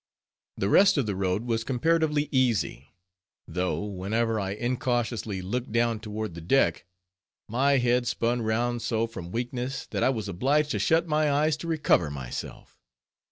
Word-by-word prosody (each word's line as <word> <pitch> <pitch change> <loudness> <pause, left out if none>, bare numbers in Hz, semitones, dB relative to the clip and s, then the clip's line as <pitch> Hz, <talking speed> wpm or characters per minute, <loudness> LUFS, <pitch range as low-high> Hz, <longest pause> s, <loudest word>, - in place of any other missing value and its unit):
The 95 - 0
rest 190 - +5
of 135 - +2
the 100 -2 -2
road 95 +3 -1
was 115 -2 -1
comparatively 150 +3 +1
easy; 130 -5 +1 0.6
though 90 +4 -2
whenever 110 +3 -1
I 95 -1 -2
incautiously 120 -4 -2
looked 120 +6 -3
down 115 -1 +1
toward 110 -2 -5
the 85 - -8
deck, 85 -2 +2 0.6
my 135 +5 +2
head 125 0 +2
spun 120 0 0
round 120 +2 0
so 115 -1 0
from 95 -7 -8
weakness, 125 +5 -3
that - - -2
I - - +4
was 110 -5 -2
obliged 140 - +1
to - - -1
shut 165 +1 +2
my 150 -1 +2
eyes 150 +2 +2
to 170 - -7
recover 150 - +2
myself. 65 -4 -7
120 Hz, 160 wpm, -27 LUFS, 105-135 Hz, 0.6 s, rest